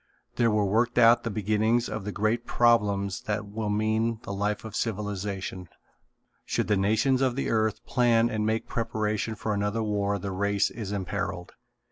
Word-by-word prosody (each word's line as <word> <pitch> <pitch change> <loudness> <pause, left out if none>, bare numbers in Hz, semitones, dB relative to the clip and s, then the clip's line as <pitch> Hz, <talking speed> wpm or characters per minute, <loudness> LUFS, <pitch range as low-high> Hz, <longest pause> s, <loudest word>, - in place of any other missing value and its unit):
There 120 -1 +3
were 105 -1 +2
worked 115 +5 +1
out 120 0 +6
the 115 - -2
beginnings 110 +3 +1
of 105 -2 -5
the 105 - -3
great 110 +4 -1
problems 100 -5 +2
that 105 0 -1
will 105 +1 -4
mean 110 +2 0
the 100 - -5
life 105 +2 -2
of 110 -1 -7
civilization. 100 -4 -3 0.7
Should - - -1
the 105 - +4
nations 110 +7 +2
of 130 -2 +1
the 135 - -1
earth 110 -1 0
plan 120 -2 +3
and 110 -3 -2
make 110 +1 0
preparation 110 -1 -2
for 110 0 -2
another 105 +2 -1
war 100 -1 0
the 100 0 -5
race 100 +1 +1
is 110 -4 -6
imperilled. 95 -2 -3
105 Hz, 170 wpm, -27 LUFS, 100-115 Hz, 0.7 s, out